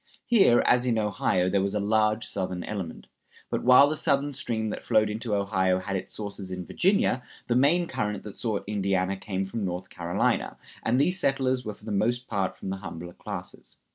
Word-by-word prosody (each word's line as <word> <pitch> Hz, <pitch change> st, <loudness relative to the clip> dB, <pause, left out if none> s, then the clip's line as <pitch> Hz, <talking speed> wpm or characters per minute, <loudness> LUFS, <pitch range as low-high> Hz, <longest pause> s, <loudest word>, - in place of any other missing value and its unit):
Here, 200 Hz, -, +5 dB
as 125 Hz, 0 st, +4 dB
in 115 Hz, -2 st, +2 dB
Ohio, 100 Hz, -4 st, +1 dB
there 100 Hz, +1 st, +2 dB
was 100 Hz, +1 st, -1 dB
a -, -, +1 dB
large 110 Hz, +2 st, +2 dB
Southern 90 Hz, -2 st, -3 dB
element. 95 Hz, -6 st, -5 dB, 0.5 s
But -, -, 0 dB
while 125 Hz, +3 st, +8 dB
the 155 Hz, -, 0 dB
Southern 145 Hz, -2 st, +1 dB
stream 110 Hz, -5 st, -2 dB
that -, -, -6 dB
flowed 110 Hz, -1 st, +3 dB
into 110 Hz, 0 st, -2 dB
Ohio 95 Hz, -2 st, +1 dB
had 95 Hz, +1 st, -3 dB
its 95 Hz, -, -4 dB
sources 100 Hz, -2 st, -5 dB
in 90 Hz, -1 st, -5 dB
Virginia, 185 Hz, -, +2 dB, 0.2 s
the 120 Hz, -, 0 dB
main 150 Hz, +7 st, +4 dB
current 105 Hz, -, -3 dB
that 105 Hz, -, -8 dB
sought 110 Hz, -4 st, -2 dB
Indiana 100 Hz, -2 st, 0 dB
came 95 Hz, -1 st, -3 dB
from 105 Hz, +3 st, -4 dB
North 90 Hz, -1 st, -4 dB
Carolina; 85 Hz, -1 st, -1 dB, 0.2 s
and 120 Hz, +3 st, +1 dB
these 180 Hz, +6 st, +2 dB
settlers 130 Hz, -4 st, +1 dB
were 105 Hz, -2 st, -5 dB
for -, -, -18 dB
the -, -, -4 dB
most 120 Hz, +5 st, 0 dB
part 100 Hz, -4 st, -1 dB
from 95 Hz, -, -5 dB
the 95 Hz, -, -3 dB
humbler 85 Hz, -2 st, -8 dB
classes. -, -, -8 dB
105 Hz, 200 wpm, -27 LUFS, 95-125 Hz, 0.5 s, while